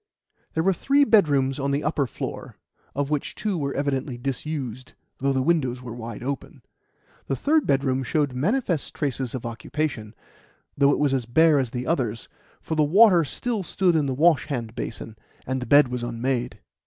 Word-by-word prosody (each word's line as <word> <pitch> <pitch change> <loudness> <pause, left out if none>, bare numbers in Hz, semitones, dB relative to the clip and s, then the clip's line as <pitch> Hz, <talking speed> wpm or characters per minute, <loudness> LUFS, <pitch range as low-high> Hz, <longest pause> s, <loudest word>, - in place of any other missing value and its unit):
There 160 - +1
were 195 +2 +3
three 280 - +3
bedrooms 145 - +3
on 140 0 -1
the 140 +2 0
upper 150 -3 0
floor, - - -7 0.4
of 140 +1 -1
which 150 -2 -2
two 210 -3 -2
were 140 -4 -2
evidently 135 -2 -2
disused, 130 -1 -5 0.3
though 135 +1 +1
the 130 -1 +1
windows 130 -6 0
were 120 -2 -7
wide 115 -1 -7
open. 140 +1 -5 0.6
The 135 - 0
third 305 - +1
bedroom 135 -1 +1
showed 145 +1 0
manifest 175 - -1
traces 130 -3 -2
of 125 - -6
occupation, 115 -2 -4 0.6
though 140 0 +4
it - - +1
was 145 -2 +1
as 125 -4 -1
bare 155 +4 +4
as 130 -3 -1
the 125 +1 -4
others, 120 -8 -1 0.3
for - - -4
the 155 - +2
water 180 +2 +6
still 225 - -3
stood 185 -1 +1
in 150 -3 +2
the 130 - -1
wash 160 +2 +3
hand 120 -7 -4
basin, 115 -2 -6 0.3
and 130 0 -2
the 125 - -5
bed 145 -2 +6
was 125 -1 -3
unmade. 120 -1 -2
140 Hz, 180 wpm, -24 LUFS, 125-155 Hz, 0.6 s, water